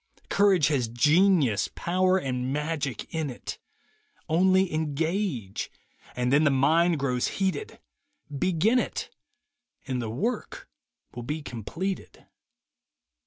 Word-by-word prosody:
Courage 190 -7 +4
has 130 -6 +1
genius, 150 - +3
power 185 +2 +2
and 130 -5 -2
magic 150 -4 -3
in 160 -3 -1
it; 125 - -7 0.7
Only 185 +2 +3
engage, 155 - -2 0.5
and 125 +1 0
then 150 +2 +5
the 155 - +5
mind 160 +5 +3
grows 125 -3 0
heated 195 - -2 0.3
— 290 - -14
Begin 185 - +3
it - - -3 0.7
and 130 -2 -2
the 115 - -4
work 215 - -3 0.5
will 120 - -6
be 150 +6 -4
completed. 165 - -5
155 Hz, 115 wpm, -27 LUFS, 130-185 Hz, 0.7 s, then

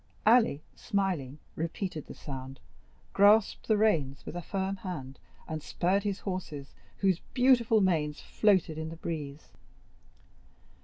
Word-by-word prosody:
Ali, 225 - +4
smiling, 180 - -2 0.2
repeated 165 0 -4
the - - -9
sound, 135 -1 -8 0.5
grasped 205 +1 +4
the 215 - +3
reins 150 -11 +1
with - - -7
a 175 - -3
firm 195 +2 -2
hand, 150 -9 -7 0.3
and 155 -1 -4
spurred 185 +6 0
his 200 -1 -3
horses, 175 -8 -5 0.2
whose 190 -3 +2 0.2
beautiful 245 -4 +4
manes 155 -6 +1
floated 185 -7 +2
in 160 0 -4
the 165 - -7
breeze. 155 -3 -6
180 Hz, 125 wpm, -30 LUFS, 150-200 Hz, 0.5 s, Ali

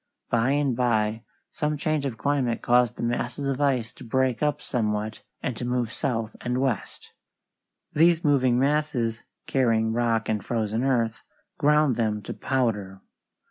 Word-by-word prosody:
By 120 +2 +2
and 145 -4 +1
by 110 -3 +1 0.3
some 150 0 -1
change 150 -1 0
of 120 -4 -5
climate 130 -1 0
caused 120 -1 +3
the - - -5
masses 120 +3 -2
of 135 +1 -1
ice 130 -6 +1
to - - -13
break 130 +1 0
up 150 -1 +1
somewhat 110 -4 -2 0.2
and 125 - -2
to - - -5
move 125 -2 -1
south 115 -6 -2
and 125 0 -1
west. 130 -5 -2 0.8
These 165 +2 +4
moving 130 -4 +3
masses, 130 -5 0 0.2
carrying 115 -4 +2
rock 115 -1 +1
and 105 -2 -1
frozen 115 0 -1
earth, 115 -4 +1 0.4
ground 150 -3 +3
them 105 -3 0
to - - -5
powder. 105 -7 -1
120 Hz, 150 wpm, -26 LUFS, 115-140 Hz, 0.8 s, These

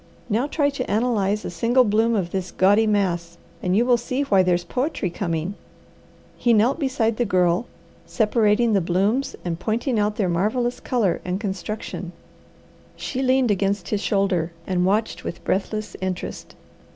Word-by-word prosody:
Now 235 +7 +1
try 290 -1 +1
to 280 - -4
analyze 210 -2 +1
a - - -4
single 235 +9 +3
bloom 225 +1 +2
of 180 -4 -1
this 190 -1 -3
gaudy 205 +4 +3
mass, 175 -5 0 0.2
and 180 +1 +1
you 235 - +3
will 245 -1 +4
see 255 +4 -2
why 200 -9 +4
there's 180 -1 +1
poetry 250 - -2
coming." 170 0 -2 0.8
He 240 - +3
knelt 235 +8 +3
beside 255 -6 0
the 245 - +2
Girl, 180 0 +1 0.4
separating 220 0 +2
the 195 - +3
blooms 200 +10 0
and 170 -1 -2
pointing 230 +3 -1
out 210 0 +1
their 200 -4 0
marvellous 220 +8 0
colour 220 -9 0
and 180 +1 -2
construction. 190 -2 -5 0.8
She 265 - -4
leaned 260 -2 +3
against 195 -1 0
his 210 -2 -1
shoulder, 190 -6 0
and 180 -1 +1
watched 215 +3 0
with - - -6
breathless 215 +2 -2
interest. 185 -1 -5
210 Hz, 160 wpm, -23 LUFS, 185-235 Hz, 0.8 s, will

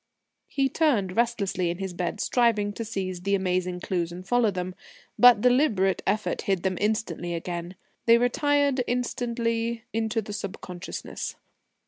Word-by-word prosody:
He 275 -1 +1
turned 240 - +1
restlessly 215 -7 0
in 170 - -3
his 190 -1 -4
bed, 180 +3 -3
striving 215 -5 +2
to 230 - -4
seize 190 -5 -4
the 200 +2 +1
amazing 180 -1 -1
clues 175 -2 -1
and 180 +2 -9
follow 245 0 +3
them. 185 -1 -3 0.5
But 245 -4 +8
deliberate 240 -7 +3
effort 210 +2 0
hid 190 -3 0
them 185 -2 -1
instantly 205 -5 -1
again; 175 +1 -5 0.3
they 230 0 +8
retired 280 +2 +2
instantly 235 -1 -1
into 225 0 0
the 210 - -7
subconsciousness. 190 -3 -6
205 Hz, 140 wpm, -26 LUFS, 185-235 Hz, 0.5 s, But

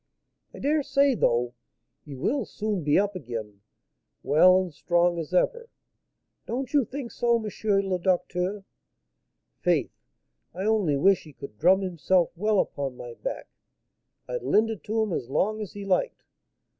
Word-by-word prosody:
I - - -12
dare 300 +2 +1
say, 280 0 +3
though, 120 - +1 0.5
he 145 -3 -8
will 215 - 0
soon 210 -3 -3
be 145 0 +3
up 200 0 +1
again, 115 - -6 0.6
well 180 +6 +6
and 185 -4 -4
strong 175 +2 +1
as 160 0 -6
ever. 470 - +1 0.8
Don't 255 +4 -4
you 285 -4 +4
think 255 0 -6
so, 240 -1 +2
M. 225 - -5 0.4
le 185 -2 -1
Docteur? 185 +2 -1 1.0
Faith, - - +1 0.6
I 185 - -4
only 205 -10 +2
wish 190 +5 +3
he 155 - -13
could 135 -6 -11
drum 185 +4 +5
himself 180 -1 +1
well 210 +3 +1
upon 135 -6 -2
my 120 -1 -8
back; - - -6 0.8
I'd - - -3
lend 225 +1 +2
it 210 -8 -8
him 220 -3 0
as 120 - -3
long 215 +9 0
as 210 - -6
he 205 -1 -7
liked. 195 - 0
185 Hz, 155 wpm, -26 LUFS, 155-220 Hz, 1.0 s, well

